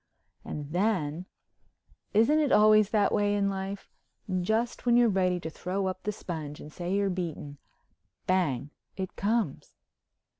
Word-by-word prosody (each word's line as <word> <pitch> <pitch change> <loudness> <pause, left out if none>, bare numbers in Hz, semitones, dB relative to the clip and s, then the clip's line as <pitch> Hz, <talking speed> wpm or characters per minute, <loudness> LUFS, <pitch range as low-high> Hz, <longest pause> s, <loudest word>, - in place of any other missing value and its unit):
And 150 -1 -6
then—isn't 195 - -1
it 295 -3 +1
always 215 -1 +6
that 210 -2 +2
way 205 0 +2
in 200 -1 +1
life? 195 +1 -6 0.5
Just 225 +6 -1
when 240 0 +5
you're 240 -1 +5
ready 185 -2 +1
to 160 - -4
throw 190 +4 -3
up 185 0 -3
the 210 - -2
sponge 155 -7 -6
and 150 - -11
say 175 0 -4
you're 200 -1 +1
beaten, 160 -5 -5 0.7
Bang—it 175 +1 -2
comes! 210 -6 -1
190 Hz, 135 wpm, -28 LUFS, 175-210 Hz, 0.7 s, always